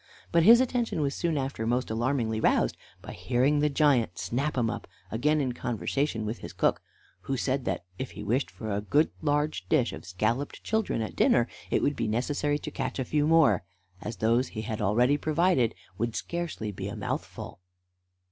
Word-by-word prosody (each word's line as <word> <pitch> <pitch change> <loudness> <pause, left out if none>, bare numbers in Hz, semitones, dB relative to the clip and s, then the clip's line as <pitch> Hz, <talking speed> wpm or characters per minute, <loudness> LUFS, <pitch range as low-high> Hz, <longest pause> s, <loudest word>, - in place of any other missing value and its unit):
But 170 - +4
his 230 +8 +8
attention 245 -9 0
was 140 -1 0
soon 170 -3 -1
after 135 -5 -2
most 120 0 0
alarmingly 115 -1 0
roused - - +2 0.3
by - - -7
hearing 130 +4 +1
the 150 +1 +3
giant 135 - +2
Snap 130 +12 -2
'em 120 -2 +2
up 115 -1 -4 0.2
again 150 +7 +2
in 130 -4 0
conversation 120 0 -2
with 110 +2 -3
his - - -8
cook, - - +1 0.5
who 135 - 0
said 130 +1 -1
that, 85 - -2
if 130 - -3
he - - -7
wished 125 +7 0
for 110 -2 -6
a 100 +1 -1
good 145 +9 +2
large 150 0 0
dish 130 - +2
of 80 +2 -9
scolloped 110 +9 -2
children 220 - 0
at 110 - -6
dinner, 120 0 +4 0.2
it - - +1
would 145 - +2
be 115 - -1
necessary 145 +6 0
to - - -7
catch 130 -1 -3
a 130 - -1
few 150 +3 +1
more, 155 - +5 0.4
as 115 - -5
those 115 +6 +2
he 110 - -6
had 110 -1 -4
already 120 +8 +3
provided 155 -6 +2 0.2
would 115 0 -1
scarcely 170 -11 -3
be 95 - -5
a - - -5
mouthful. - - -5
130 Hz, 190 wpm, -28 LUFS, 110-150 Hz, 0.5 s, his